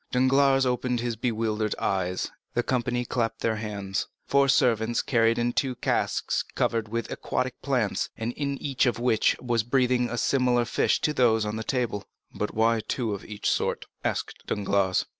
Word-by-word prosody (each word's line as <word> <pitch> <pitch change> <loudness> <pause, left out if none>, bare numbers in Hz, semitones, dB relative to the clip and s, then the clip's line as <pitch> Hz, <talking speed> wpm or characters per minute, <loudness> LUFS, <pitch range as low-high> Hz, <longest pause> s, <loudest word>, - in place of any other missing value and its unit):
Danglars 135 +1 +4
opened 125 -1 0
his 120 -1 -2
bewildered 110 -2 -1
eyes; 90 -1 -1 0.2
the 120 - +2
company 125 -1 0
clapped 115 -2 -2
their 110 -1 0
hands. 100 -3 -3 0.2
Four 140 0 +3
servants 120 -3 +2
carried 115 -2 +2
in 120 0 0
two 130 -2 0
casks - - 0
covered 115 -1 0
with 115 +2 -3
aquatic 130 0 -3
plants, 125 -7 0
and 115 +2 -3
in 140 0 -2
each 135 -2 0
of 120 - +1
which 120 -2 +2
was 120 -2 +1
breathing 125 +1 +1
a 120 - -3
fish - - 0
similar 125 -3 +2
to 150 +5 +1
those 115 -5 +3
on 105 +1 -3
the 110 - -3
table. 120 -5 -1 0.3
"But 105 - -3
why 115 +1 +3
have 110 - -6
two 115 -5 -1
of 100 - -6
each 105 -1 -4
sort?" - - 0 0.2
asked - - -3
Danglars. 100 -2 +1
120 Hz, 175 wpm, -26 LUFS, 110-125 Hz, 0.3 s, Danglars